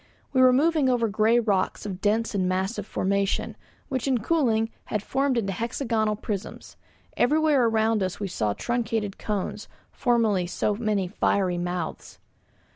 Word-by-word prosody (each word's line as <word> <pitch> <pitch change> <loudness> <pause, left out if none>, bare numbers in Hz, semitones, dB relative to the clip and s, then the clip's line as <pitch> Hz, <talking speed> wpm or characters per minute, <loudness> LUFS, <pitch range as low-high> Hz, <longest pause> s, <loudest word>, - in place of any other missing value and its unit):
We 260 - +4
were 255 0 +7
moving 295 +1 +3
over 240 -2 +2
grey 220 +3 +3
rocks 205 -5 0
of 195 -2 -5
dense 220 +2 +1
and 185 -2 0
massive 190 +3 -2
formation, 200 +1 -1 0.3
which 260 -2 -2
in 260 -2 +3
cooling 230 -4 +1
had 210 -1 -3
formed 270 +1 0
into 195 -4 -1
hexagonal 225 0 -1
prisms. 205 -2 -6 0.4
Everywhere 300 -2 +3
around 220 -1 +2
us 185 -1 -2
we 200 - -2
saw 105 - -1
truncated 225 - -2
cones, 205 -3 -3 0.2
formerly 220 -7 +1
so 205 - 0
many 210 -3 -1
fiery 180 -1 0
mouths. 175 -1 -4
220 Hz, 145 wpm, -25 LUFS, 195-240 Hz, 0.4 s, were